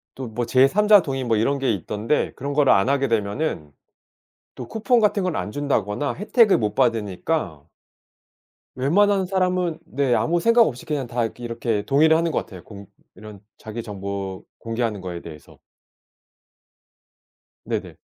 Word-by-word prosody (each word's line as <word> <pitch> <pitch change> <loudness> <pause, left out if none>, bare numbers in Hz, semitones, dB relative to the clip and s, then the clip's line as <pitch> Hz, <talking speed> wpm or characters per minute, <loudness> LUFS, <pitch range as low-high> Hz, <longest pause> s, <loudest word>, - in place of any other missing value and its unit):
또 130 -2 -6
뭐 115 +2 -3
제삼자 190 - +5
동의 135 -4 -3
뭐 115 -3 +1
이런 140 +6 +1
게 135 -3 +1
있던데 105 - -2
그런 140 +2 -4
거를 145 -2 +4
안 100 +7 +2
하게 140 -1 +1
되면은 105 - -2 0.8
또 - - -8
쿠폰 230 +2 +1
같은 205 -2 +2
걸 180 -3 -1
안 105 - -4
준다거나 140 -2 -1
혜택을 210 +2 +3
못 105 -2 -2
받으니까 110 - -1 1.1
웬만한 190 +8 +2
사람은 180 -3 0
네 135 -2 0
아무 170 +6 +1
생각 230 +5 +4
없이 125 - 0
그냥 140 -5 -3
다 120 -1 -1
이렇게 120 +2 -8
이렇게 115 -2 -2
동의를 155 +3 +4
하는 165 0 +1
것 - - 0
같아요. 95 -3 -11
공 100 -2 -12 0.3
이런 105 -2 -12 0.2
자기 110 +2 -7
정보 100 -2 -6
공개하는 115 -3 -3
거에 90 -2 -6
대해서. 75 -3 -13 2.1
네네. - - -4
130 Hz, 305 characters per minute, -22 LUFS, 105-160 Hz, 2.1 s, 제삼자